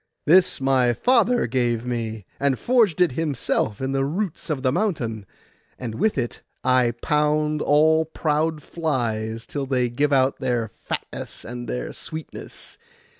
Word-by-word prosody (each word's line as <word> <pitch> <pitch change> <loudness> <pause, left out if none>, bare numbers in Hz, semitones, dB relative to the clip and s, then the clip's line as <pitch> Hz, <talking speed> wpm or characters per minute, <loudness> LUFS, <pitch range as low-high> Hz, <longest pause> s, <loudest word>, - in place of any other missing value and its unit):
'This 180 +4 +5
my 130 -2 +3
father 245 - +3
gave 120 -1 0
me, 115 -4 -3
and 140 -2 +2
forged 225 -9 +2
it 180 - +4
himself 135 -7 -1
in 135 0 -2
the 135 0 +1
roots 170 +2 -3
of 140 -4 -2
the 130 - +3
mountain; 125 - -1 0.5
and 120 -3 -5
with 210 - +1
it 120 - -3 0.2
I 125 -2 +3
pound 150 0 +1
all 160 +2 +4
proud 155 0 -1
flies 115 -8 -2
till 140 -2 -4
they 125 -2 +1
give 140 +5 0
out 135 -1 +3
their 120 -4 -1
fatness 115 - -6
and 120 +1 -6
their 60 0 -3
sweetness. 160 0 -8
135 Hz, 145 wpm, -23 LUFS, 120-160 Hz, 0.5 s, This